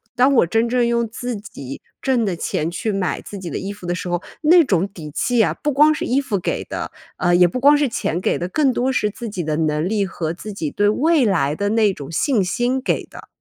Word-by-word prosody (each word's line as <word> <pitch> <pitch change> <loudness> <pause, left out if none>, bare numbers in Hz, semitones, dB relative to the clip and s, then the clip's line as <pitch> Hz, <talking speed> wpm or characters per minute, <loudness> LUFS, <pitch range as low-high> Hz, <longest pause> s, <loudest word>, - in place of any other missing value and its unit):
当 255 +3 +4
我 205 - +4
真 225 +6 +1
正 245 -1 +2
用 235 0 +1
自 245 +2 -4
己 140 -11 -9 0.2
挣 260 -3 +1
的 190 -5 -1
钱 160 0 -2
去 180 +5 -3
买 195 -2 -1
自 205 - -9
己 185 -3 -6
的 - - -4
衣 195 +2 -5
服 205 -3 -12
的 175 - -1
时 180 - -5
候， 175 0 -1 0.2
那 335 +3 +7
种 190 - +1
底 160 -6 -10
气 240 - +1
啊， - - +1
不 295 - 0
光 300 +3 +5
是 305 - -3
衣 270 +3 +1
服 230 -8 -2
给 - - -2
的， - - -5 0.3
呃， 175 0 +2
也 180 0 +6
不 175 +8 -1
光 290 +3 +6
是 290 -2 +1
钱 175 -6 -2
给 - - 0
的， 175 - -2
更 270 +8 +2
多 255 +1 0
是 210 -5 +1
自 235 +3 -7
己 190 -5 -4
的 155 -1 -1
能 155 0 0
力 210 -2 +1
和 165 -4 -3
自 205 +5 -7
己 160 -7 -4
对 205 - +1
未 295 +6 +3
来 165 -9 +1
的 200 +6 -2
那 215 -2 +3
种 140 -6 -9
信 210 - +1
心 245 +8 0
给 - - -1
的。 - - -13
205 Hz, 275 characters per minute, -20 LUFS, 175-250 Hz, 0.3 s, 那